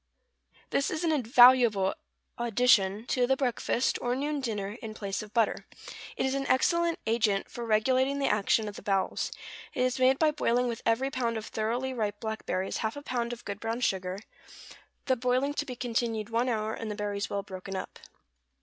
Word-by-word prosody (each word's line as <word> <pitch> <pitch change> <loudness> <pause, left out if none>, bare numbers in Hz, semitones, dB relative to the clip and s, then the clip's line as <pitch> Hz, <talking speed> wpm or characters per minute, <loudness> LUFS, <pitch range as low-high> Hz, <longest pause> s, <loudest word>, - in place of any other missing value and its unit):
= - - -33
This 275 - +1
is 315 - -3
an 330 - +2
invaluable 240 -6 +5 0.4
addition 225 -3 +3
to 250 -1 +1
the 265 +1 +2
breakfast, 250 -1 0
or 245 0 0
noon 290 +2 -2
dinner, 210 -5 -3
in 220 -1 -7
place 200 -3 -3
of 210 -1 -10
butter. 225 -1 0 0.5
It - - 0
is 265 - 0
an 275 0 -2
excellent 340 +5 +2
agent 215 -3 +1
for 235 -1 -6
regulating 260 +5 +2
the 280 - 0
action 215 0 +2
of 205 - -7
the - - -9
bowels. 195 -2 -1 0.4
It 250 - +1
is 255 0 0
made 260 +1 +4
by 310 0 +3
boiling 250 -4 +1
with 235 -2 -4
every 255 +4 +1
pound 235 -3 -1
of 220 - -5
thoroughly 240 +5 -2
ripe 210 -4 -2
blackberries 220 -4 -3
half 220 +4 -2
a 285 - -8
pound 240 -3 -2
of 240 0 -8
good 200 0 -5
brown 225 +2 -3
sugar; 185 -4 -1 0.9
the 260 - +2
boiling 255 +3 +1
to 290 0 -3
be 250 - -5
continued 230 -2 -2
one 235 +3 +1
hour, 220 -2 -1
and 225 - -5
the 210 - -3
berries 205 -1 -3
well 200 0 -2
broken 195 -1 -7
up. 190 - -6
235 Hz, 195 wpm, -29 LUFS, 215-255 Hz, 0.9 s, invaluable